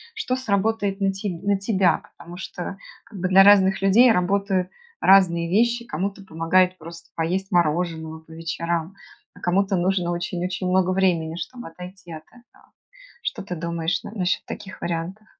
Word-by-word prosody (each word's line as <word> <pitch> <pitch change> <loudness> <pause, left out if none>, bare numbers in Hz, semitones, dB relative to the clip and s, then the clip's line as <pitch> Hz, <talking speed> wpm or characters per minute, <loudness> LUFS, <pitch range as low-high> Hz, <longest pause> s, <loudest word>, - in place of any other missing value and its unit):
что 255 -13 -1
сработает 205 -3 0
на 195 0 +2
те 195 +2 -4
на 195 +3 -1
тебя, 190 -5 +2 0.2
потому 175 +1 -11
что 190 +1 -6 0.3
как 205 - -11
бы 180 - 0
для 190 +1 +8
разных 195 -1 +5
людей 225 +6 +6
работают 190 -1 +1 0.3
разные 170 -3 +5
вещи. 235 +4 +2
Кому-то 195 +2 -4
помогают 180 +2 +2
просто 170 0 -12
поесть 185 +4 -2
мороженого 160 -2 0
по 160 - -19
вечерам, 165 +2 -3 0.4
а - - -14
кому-то 195 +2 +1
нужно 180 -1 0
очень-очень 180 +2 -3
много 185 0 +2
времени, 175 -4 +1
чтобы 245 +8 -7
отойти 180 +1 -11
от 155 0 -9
этого. 245 0 -23 0.5
Что - - -3
ты 180 -2 -6
думаешь 170 +1 -2
н - - -8
насчет 185 -2 0
таких 205 -2 -8
вариантов? 175 +5 -4
185 Hz, 155 wpm, -23 LUFS, 170-195 Hz, 0.5 s, для